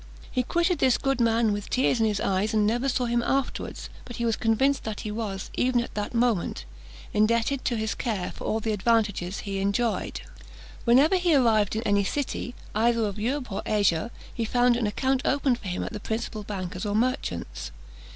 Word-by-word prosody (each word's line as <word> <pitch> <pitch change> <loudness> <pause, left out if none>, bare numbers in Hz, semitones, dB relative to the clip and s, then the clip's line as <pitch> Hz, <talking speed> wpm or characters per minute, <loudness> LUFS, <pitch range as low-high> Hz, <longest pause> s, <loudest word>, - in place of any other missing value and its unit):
He 255 - +1
quitted 340 +5 +1
this 260 -2 +4
good 270 -2 0
man 225 -2 +3
with 205 0 -5
tears 255 -1 +2
in 225 - +3
his 210 -2 0
eyes, 205 +3 0
and 210 -1 +3
never 240 +5 +1
saw 250 -1 0
him 235 0 +1
afterwards; 270 +2 -2 0.2
but 240 - -9
he 235 - -2
was 225 -1 +2
convinced 265 +5 +2
that 215 -1 -4
he 210 - -4
was, 210 -3 -4
even 250 -1 +2
at 235 - -4
that 210 +3 -3
moment, 230 -6 +1 0.5
indebted 230 +5 +2
to 240 - +1
his 220 0 -1
care 210 -7 -2
for - - -9
all 220 - 0
the 220 0 -2
advantages 205 -3 +1
he 195 -1 -3
enjoyed. 200 +4 -1 0.6
Whenever 275 +10 +5
he 350 -3 +3
arrived 220 -6 +3
in 220 - -1
any 205 -2 +2
city, 250 +2 -3 0.2
either 230 +1 +2
of 205 0 -4
Europe 250 +2 -2
or 195 - -2
Asia, 200 -3 +2 0.2
he 230 - -2
found 245 +2 +3
an 235 -3 0
account 260 +5 0
opened 265 -3 +1
for 200 - -8
him 180 - -2
at - - -5
the 210 - -4
principal 220 0 -3
bankers' 185 -2 -5
or 205 - -1
merchants'. 255 +4 -2
225 Hz, 200 wpm, -26 LUFS, 210-250 Hz, 0.6 s, Whenever